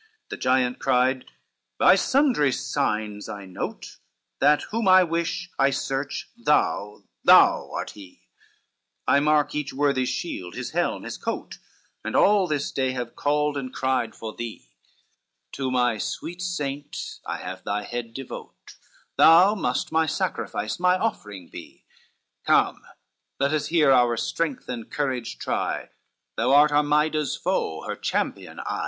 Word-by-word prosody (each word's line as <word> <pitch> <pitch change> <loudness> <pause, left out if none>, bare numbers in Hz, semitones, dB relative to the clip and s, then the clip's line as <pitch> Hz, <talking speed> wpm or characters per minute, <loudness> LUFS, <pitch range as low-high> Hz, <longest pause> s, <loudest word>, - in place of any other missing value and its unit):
CII 435 0 -36
The - - -5
giant 125 -1 +1
cried, 125 +1 +2 0.5
"By - - +6
sundry 240 - +3
signs 105 -7 -2
I 100 -1 -7
note 95 - -6 0.4
That 150 0 +4
whom 225 -1 -1
I 185 0 +7
wish, 170 +1 -2
I 135 - +5
search, 135 +1 -3
thou, 150 - 0 0.2
thou - - +6
art - - -4
he, 95 -3 -14 0.8
I 140 - +5
marked 150 0 +2
each 150 -2 -3
worthy's 135 -2 +1
shield, 90 - -5
his - - -5
helm, - - -1
his - - -6
coat, - - -5 0.4
And - - -4
all 200 -2 +4
this 145 -3 -2
day 130 -1 -1
have 120 -2 -5
called 150 0 0
and 130 -2 -4
cried 130 -3 -1
for 110 -1 -7
thee, 120 -2 -8 0.8
To 135 -1 -3
my 120 -3 +1
sweet 175 +10 -5
saint 145 -5 -4
I - - -2
have 95 0 -7
thy 105 +1 -2
head 115 0 -6
devote, 135 -1 -9 0.4
Thou 175 +5 +7
must 215 - -2
my 160 0 +2
sacrifice, 150 - -2
my 180 +1 +3
offering 105 - -4
be, - - -12 0.6
Come - - +3 0.6
let 140 +2 +1
us 150 -1 0
here 155 -3 +4
our 120 -2 +4
strength 160 +3 -2
and 120 -3 -6
courage 130 -5 -3
try, - - -3 0.5
Thou 125 +3 +2
art 145 +2 +6
Armida's 150 0 +2
foe, 80 -1 -2
her - - -4
champion - - -3
I." - - -3
140 Hz, 145 wpm, -25 LUFS, 120-160 Hz, 0.8 s, I